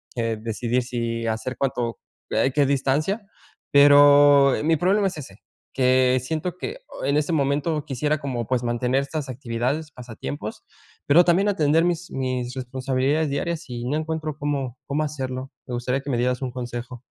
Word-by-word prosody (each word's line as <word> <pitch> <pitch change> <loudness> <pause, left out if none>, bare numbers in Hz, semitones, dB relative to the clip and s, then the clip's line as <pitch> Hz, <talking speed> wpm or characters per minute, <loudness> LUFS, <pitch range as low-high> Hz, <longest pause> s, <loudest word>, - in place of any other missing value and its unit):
que 115 -1 -1
decidir 115 +3 -1
si 115 -2 -3
hacer 110 +3 -3
cuánto, 120 -4 -2 0.3
eh, 135 - +2
qué 145 -2 +3
distancia. 150 - 0 0.4
Pero, 145 -1 +7
eh, - - -3
mi 165 +1 +3
problema 195 +4 +2
es 175 - -5
ese, 105 -9 -9 0.4
que 130 0 +3
siento 160 +6 -3
que 460 - -5
o - - -7
en 140 +1 +1
este 150 +3 0
momento 145 +1 0
quisiera 150 +3 -1
como, 125 -5 -3
pues, 125 -2 0
mantener 125 +3 0
estas 140 -1 -5
actividades, 130 +5 -3
pasatiempos, 115 - -7 0.4
pero 165 +5 +7
también 185 +4 +3
atender 160 -4 +3
mis 175 0 -2
mis 130 -1 -2
responsabilidades 130 +4 -1
diarias, 160 +2 -3
y 120 0 -5
no 140 +4 -1
encuentro 155 -1 -3
cómo 140 -4 -3
cómo 150 +2 0
hacerlo. 130 -3 -4 0.2
Me 125 - -6
gustaría 125 +3 -1
que 145 - -8
me 120 - 0
dieras 125 +2 0
un 130 -2 -3
consejo. 120 0 -6
135 Hz, 170 wpm, -23 LUFS, 125-150 Hz, 0.4 s, Pero